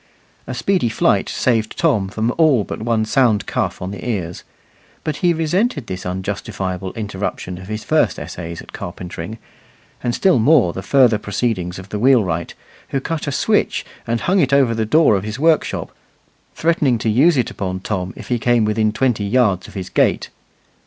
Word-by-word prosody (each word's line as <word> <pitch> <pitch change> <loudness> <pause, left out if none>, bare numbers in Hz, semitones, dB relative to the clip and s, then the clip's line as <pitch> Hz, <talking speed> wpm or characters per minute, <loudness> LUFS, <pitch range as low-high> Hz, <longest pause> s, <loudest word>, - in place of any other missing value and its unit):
A - - -4
speedy 185 -11 +1
flight - - +1
saved 115 -4 0
Tom 135 - +2
from 110 +4 -1
all 145 -9 +4
but - - -6
one 110 -1 +1
sound 110 -3 +2
cuff - - -2
on 95 - -4
the 100 - -8
ears; 90 -8 -3 0.6
but 155 -2 -2
he 175 - +2
resented 165 - 0
this 90 -3 -5
unjustifiable 95 0 -4
interruption 95 -4 -4
of 95 - -10
his 110 +1 -4
first - - +2
essays 85 -1 -7
at - - -16
carpentering, 90 +4 -7 0.6
and 120 -1 -1
still 190 -9 +3
more 115 - +4
the 95 - -5
further 120 +1 +4
proceedings 100 -4 -2
of 95 +1 -10
the 105 - -3
wheelwright, 105 -10 +2 0.3
who 135 - -1
cut 155 +2 -4
a - - 0
switch, - - +1 0.2
and 115 0 -1
hung 190 +2 +2
it 140 -6 +2
over 135 -4 +4
the 110 -1 -1
door 150 -3 +5
of 95 - -1
his 110 +2 -5
workshop, 160 +1 +1 0.6
threatening 150 -6 +2
to 115 - -3
use 140 +9 +4
it 125 - 0
upon 95 -1 -4
Tom 95 -2 -3
if - - -10
he 120 -1 +1
came 120 -1 +3
within 105 0 +1
twenty 120 -2 0
yards 100 -4 +2
of - - -14
his 95 -2 -5
gate. - - +1
110 Hz, 180 wpm, -19 LUFS, 95-135 Hz, 0.6 s, door